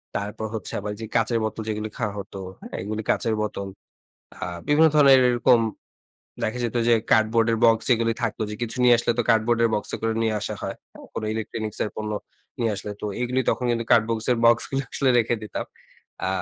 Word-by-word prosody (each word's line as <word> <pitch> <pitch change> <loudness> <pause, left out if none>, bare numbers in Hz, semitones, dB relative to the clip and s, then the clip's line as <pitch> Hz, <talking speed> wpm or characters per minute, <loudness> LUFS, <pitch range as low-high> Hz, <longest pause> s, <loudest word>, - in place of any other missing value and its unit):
তারপর 105 +2 -3
হচ্ছে 110 -3 -5
আবার 105 +1 -4
যে, 115 - -5
কাঁচের 115 0 +2
বোতল, 110 +1 -3
যেগুলো 110 0 -3
খাওয়া 105 -4 -2
হত, 100 -1 -7 0.3
হ্যাঁ? - - -8
এগুলো 105 +3 -3
কাঁচের 115 - +1
বোতল। 100 -2 -3 0.7
আ - - -14 0.3
বিভিন্ন 150 +2 +5
ধরনের 140 -2 +8
এর 130 - +4
এরকম 120 0 +4 0.8
দেখা 110 +3 -1
যেত 120 +1 -2
যে, 120 - +6 0.2
কার্ডবোর্ডের 115 +1 +3
বক্স 115 -1 +4
এগুলি 115 0 0
থাকত, 115 -3 -1
যে, - - -4
কিছু 120 +1 -3
নিয়ে 120 -1 +7
আসলে 120 - +1
তো - - +4
কার্ডবোর্ডের 115 +1 +3
বক্স 105 - -3
করে 115 0 0
নিয়ে 110 -1 +1
আসা - - -3
হয়, - - -4 0.2
হ্যাঁ? - - -13
কোনো 110 - -3
ইলেকট্রনিক্সের 110 -1 -3
পণ্য 105 0 -4 0.5
নিয়ে 115 -2 +1
আসলে। 100 +1 -6
তো - - -6 0.2
এগুলি 125 +1 0
তখন 125 - -2
কিন্তু 115 -1 0
কার্ডবোর্ডের 115 +1 +2
বক্সগুলো 120 +4 +3
আসলে 135 -2 +2
রেখে 120 0 +2
দিতাম। 105 - -4 0.6
আ - - 0
115 Hz, 190 wpm, -24 LUFS, 110-120 Hz, 0.8 s, ধরনের